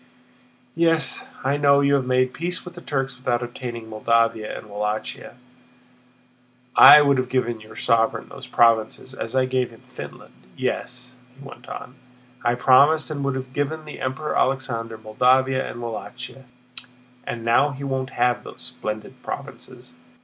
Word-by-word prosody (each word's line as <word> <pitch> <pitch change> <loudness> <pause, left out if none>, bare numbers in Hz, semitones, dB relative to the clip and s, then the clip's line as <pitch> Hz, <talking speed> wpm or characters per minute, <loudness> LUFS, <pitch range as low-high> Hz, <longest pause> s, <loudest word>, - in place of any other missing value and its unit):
"Yes, 165 -4 +1 0.2
I 135 +2 +1
know 140 -1 +5
you 140 0 +3
have 135 -2 +1
made 130 0 +2
peace 180 +2 -3
with 180 - -9
the 175 - -11
Turks 135 -5 -2
without 125 -1 -1
obtaining 120 -1 -6
Moldavia 115 0 +1
and - - -10
Wallachia; 105 +3 -4 1.4
I 145 +2 +10
would 140 -2 +3
have 130 -1 -2
given 120 -3 -1
your 110 - -13
sovereign 115 -1 +1
those 135 -2 -10
provinces 115 +1 +2
as 120 -1 -5
I 130 -1 +3
gave 130 -1 0
him 115 -2 -17
Finland. - - -11 0.2
Yes," 125 +1 -4 0.2
he 140 0 -11
went 120 -1 -12
on, 125 - -8 0.5
"I 120 0 +2
promised 145 +6 +5
and 140 -2 -3
would 140 -1 0
have 130 -1 -6
given 155 +3 -2
the 150 - -9
Emperor 135 +4 -2
Alexander 115 -4 -1
Moldavia 130 +4 +2
and 120 - -7
Wallachia, 120 +3 -7 0.8
and 115 -1 -4
now 120 +5 +4
he 140 0 -7
won't 135 -1 -2
have 125 0 +2
those - - -11
splendid 110 0 -6
provinces. - - -8
130 Hz, 155 wpm, -23 LUFS, 115-140 Hz, 1.4 s, I